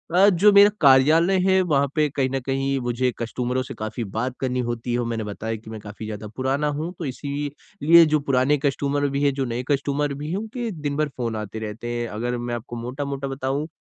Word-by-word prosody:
अ, 195 +3 +7
जो 200 +3 +5
मेरा 200 +1 +8
कार्यालय 155 +7 +5
है, 190 0 +3
वहाँ 140 -5 +2
पे 155 -1 +3
कहीं 135 -2 0
न 135 - +1
कहीं 135 0 0
मुझे 125 +1 0
कस्टमरों 125 +2 -2
से 135 - -8
काफ़ी 110 +2 -3
बात 115 +5 -3
करनी 125 -1 -1
होती 120 0 -3
है 120 - +1
और 120 - -1
मैंने 115 -2 -2
बताया 110 +2 -4
कि 110 0 -11
मैं 110 -1 -7
काफ़ी 105 +1 -8
ज़्यादा 105 0 -6
पुराना 135 +3 0
हूँ, 160 +3 -3
तो 165 - -3
इसीलिए 145 +4 +2
जो 155 - +4
पुराने 140 0 +2
कस्टमर 140 0 0
भी 140 +1 -1
हैं, 140 - +3
जो 135 0 -1
नए 120 0 -3
कस्टमर 140 +1 0
भी 145 +2 -6
हैं, 185 - -1
उनके 225 +2 -4
दिन 150 -5 -4
भर 155 0 +1
फ़ोन 115 -3 -2
आते 110 0 -5
रहते 110 +2 -6
हैं। 120 0 -2
अगर 120 +3 -3
मैं 120 0 -3
आपको 120 +1 -7
मोटा-मोटा 135 +3 -4
बताऊँ, 135 +3 -2
135 Hz, 220 wpm, -23 LUFS, 120-145 Hz, -, मेरा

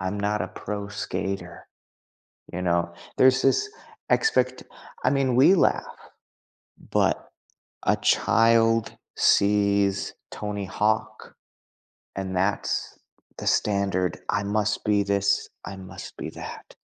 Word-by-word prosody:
I'm 95 +3 -3
not 105 +1 0
a - - -4
pro 100 -1 -6
skater, 95 -3 -5 0.8
you 90 - -4
know, 85 -1 0 0.2
there's 130 0 +5
this 135 - +2 0.4
expect 445 0 +2 0.4
I 125 - +4
mean, 135 -3 +1
we 135 +8 +7
laugh, 180 - +2 1.1
but, - - +1 0.6
a - - +5
child 115 0 +3 0.2
sees 100 -1 +3 0.2
Tony 105 -1 -4
Hawk. 105 +3 -2 0.8
And 95 -1 -4
that's 95 +3 -1 0.4
the - - -2
standard. 95 -3 0
I 105 0 0
must 105 +1 -1
be 105 -1 +3
this, 100 0 +1 0.2
I 100 - -6
must 95 -1 -10
be - - -5
that. - - -9
100 Hz, 115 wpm, -25 LUFS, 95-110 Hz, 1.1 s, we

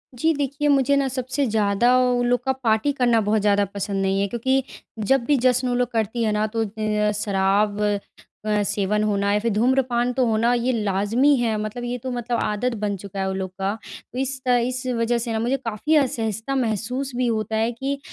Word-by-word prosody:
जी, 320 +6 +2
देखिए 285 +1 -1
मुझे 280 0 +3
ना 275 -1 +2
सबसे 260 +2 -2
ज़्यादा 220 +3 +2
उन 245 -1 +2
लोग 245 0 +1
का 265 - +2
पार्टी 220 +5 +2
करना 240 -2 +4
बहुत 210 0 +1
ज़्यादा 205 -1 +3
पसंद 200 -1 -2
नहीं 195 0 +1
है। 200 - +1
क्योंकि 260 +4 0 0.4
जब 250 +4 +2
भी 290 - +3
जश्न 255 0 +3
वो 245 - 0
लोग 250 -1 0
करती 225 +1 -1
है 215 - +1
ना 210 +1 +1
तो 225 - +2
अ, 210 0 -1
शराब 200 +1 +1
अ, 210 0 -3
सेवन 205 +1 0
होना 200 -1 +1
या 210 - +2
फिर 230 +1 -1
धूम्रपान 245 +1 +1
तो 255 -1 +1
होना 230 +2 +2
ये 245 +1 +1
लाज़मी 220 +6 +2
है 230 -3 0
मतलब 215 +3 -5
ये 245 +1 -3
तो 255 +1 -5
मतलब 240 -1 -2
आदत 230 +3 -1
बन 200 -1 0
चुका 195 +1 -8
है 190 - 0
वो 190 - -2
लोग 190 -1 -3
का। 195 +2 0 0.4
तो 255 - -4
इस 265 0 -2
इस 250 +1 +1
वज़ह 230 +1 +1
से 235 0 -3
ना 220 - -1
मुझे 250 +4 0
काफ़ी 240 +5 -1
असहजता 235 -2 0
महसूस 250 +3 -1
भी 250 -1 0
होता 220 -1 -1
है। 225 +2 +1
कि 275 +4 -3
230 Hz, 210 wpm, -23 LUFS, 210-255 Hz, 0.4 s, करना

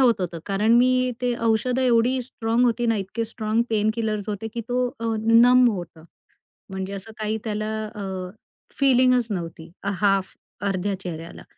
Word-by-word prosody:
होत 235 -6 +4
होतं. 175 -2 -3
कारण 210 +3 +2
मी 255 +1 +3
ते 245 -1 0
औषधं 230 +3 +1
एवढी 250 +1 +3
स्ट्राँग 235 0 0
होती 240 0 +1
ना, 225 -1 +2
इतके 200 +4 -3
स्ट्राँग 220 0 -1
पेन 215 0 +2
किलर्स 215 -3 -2
होते, 210 +1 -3
की 235 - -2
तो 245 -2 -1 0.2
नम 245 +2 +7
होतं. 175 -5 -7 0.7
म्हणजे 190 0 -5
असं 200 +3 -8
काही 215 0 -2
त्याला 215 -1 -2 0.3
अ, 210 - -6 0.8
फिलिंगच 255 -3 +4
नव्हती. 165 -4 -5
हाल्फ 195 -1 +1 0.3
अर्ध्या 195 +1 -1
चेहऱ्याला. 165 -3 -7
220 Hz, 150 wpm, -24 LUFS, 195-245 Hz, 0.8 s, नम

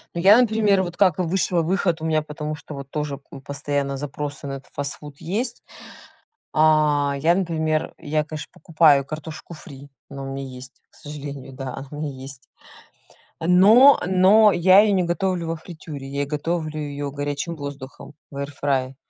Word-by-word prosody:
Ну - - -2
я, 200 +5 +7
например, 215 -5 +3
вот 175 -1 -7
как 185 -3 +3
и - - +3
высшего 180 0 0
выход 175 -1 0
у 160 - -4
меня, 155 -1 +1
потому 150 0 -6
что 150 0 -11
вот 140 -1 -8
тоже, 150 -2 -3
м, 135 - -10
постоянно 140 0 -3
запросы 145 +1 -6
на 140 - -4
этот 135 0 -9
фастфуд 145 0 -6
есть. 230 +8 -3 0.9
А, 150 -2 +3
я, 160 +5 +3
например, 160 -4 -1
я, 155 -1 -1
конечно, 155 0 -8
покупаю 155 -3 +3
картошку 155 +2 -8
фри, 140 -2 -12 0.2
она 140 -1 -7
у - - -6
меня 135 0 -5
есть, 130 0 -10 0.2
к - - -25
сожалению. 145 -2 -8
Да, 130 0 -6
она 135 - -8
у - - -7
меня 150 -1 -4
есть. 130 -1 -11 0.9
Но, 205 +11 +6
но 195 +3 +5
я 185 +3 +6
её 210 -1 +3
не 185 - +2
готовлю 175 0 -1
во 165 - -2
фритюре, 155 -4 -9
я 140 +1 -2
готовлю 155 +1 -3
её 145 -1 -4
горячим 145 +4 -4
воздухом 140 -1 -9 0.2
в 140 - -8
эир 140 0 -4
фрае. 135 -2 -1
150 Hz, 175 wpm, -22 LUFS, 140-175 Hz, 0.9 s, я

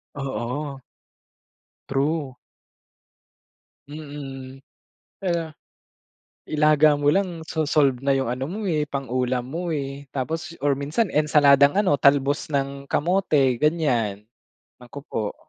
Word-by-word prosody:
Oo. 135 +1 -4 1.1
True. 140 -1 -1 1.5
Mm. 140 -3 -9 0.5
kaya 170 -4 -2 1.0
ilaga 150 0 +4
mo 145 0 +2
lang 175 -3 -1
so 160 -1 -2
solve 140 -4 +3
na 140 0 +1
yung 130 -3 -1
ano 130 +2 -3
mo, 210 +6 -5
eh, 155 -6 0
pang 135 -4 -5
ulam 125 -1 0
mo, 170 0 -2
eh, 140 0 -5
tapos 160 +5 -3
or 145 - +3
minsan 155 +10 -1
ensaladang 145 -1 +5
ano 195 -8 +2
talbos 140 0 +3
ng 140 -1 -3
kamote 150 -7 +1
ganyan. 125 -11 0 0.6
Naku 125 +3 -10
po. 105 -2 -3
145 Hz, 110 wpm, -23 LUFS, 135-155 Hz, 1.5 s, ensaladang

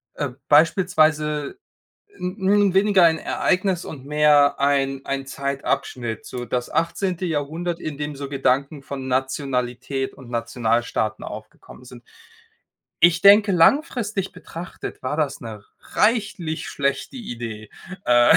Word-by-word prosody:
äh, 145 -2 -2 0.2
beispielsweise 155 - +3 0.6
'n 180 +1 -3
'n 205 -2 +4
weniger 195 -1 +4
ein 160 -1 +4
Ereignis 185 -1 0
und 135 -4 -9
mehr 150 -1 +4
ein 135 -1 +1
ein 135 0 -3
Zeitabschnitt. 135 -4 -3
So 125 -1 -6
das 125 0 -2
18. 180 +2 -1
Jahrhundert, 165 +2 -2
in 150 -3 -5
dem 145 0 -4
so 140 0 -6
Gedanken 140 +1 0
von 135 -1 -6
Nationalität 130 0 -2
und 130 -3 -14
Nationalstaaten 115 -2 -1
aufgekommen - - -10
sind. - - -13 1.0
Ich 170 +1 +5
denke, 200 +1 +7
langfristig 205 - +2
betrachtet 180 -1 -8
war 130 +3 -2
das 150 -3 -1
'ne 110 -3 -9 0.2
reichlich 205 -8 0
schlechte 140 - -2
Idee, 115 - -7 0.3
äh 120 0 +6
145 Hz, 120 wpm, -22 LUFS, 130-175 Hz, 1.0 s, denke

